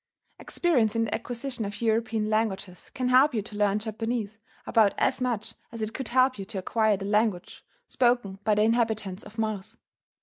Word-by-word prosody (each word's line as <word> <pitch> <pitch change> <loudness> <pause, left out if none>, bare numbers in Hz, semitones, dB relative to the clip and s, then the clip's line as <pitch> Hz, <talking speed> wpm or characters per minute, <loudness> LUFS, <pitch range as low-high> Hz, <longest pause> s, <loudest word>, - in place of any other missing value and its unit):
Experience 245 - +1
in 230 - +2
the 215 - -3
acquisition 245 +1 -4
of 200 0 -5
European 225 -1 0
languages 210 -4 -2
can 255 -1 -1
help 260 +2 +5
you 215 - 0
to 210 0 -10
learn 205 -1 +2
Japanese 220 0 -3 0.3
about 220 -4 +3
as - - +1
much 230 -3 -2 0.2
as 230 -2 -5
it 215 +1 -4
could 265 - -4
help 255 -1 +3
you 195 - -5
to 205 0 -7
acquire 215 +2 +1
the 195 - -6
language 210 -3 0 0.2
spoken 240 -6 +1
by 215 -1 +2
the 210 - +3
inhabitants 220 -4 0
of 210 +2 -13
Mars. 215 -3 -3
220 Hz, 180 wpm, -27 LUFS, 205-235 Hz, 0.3 s, help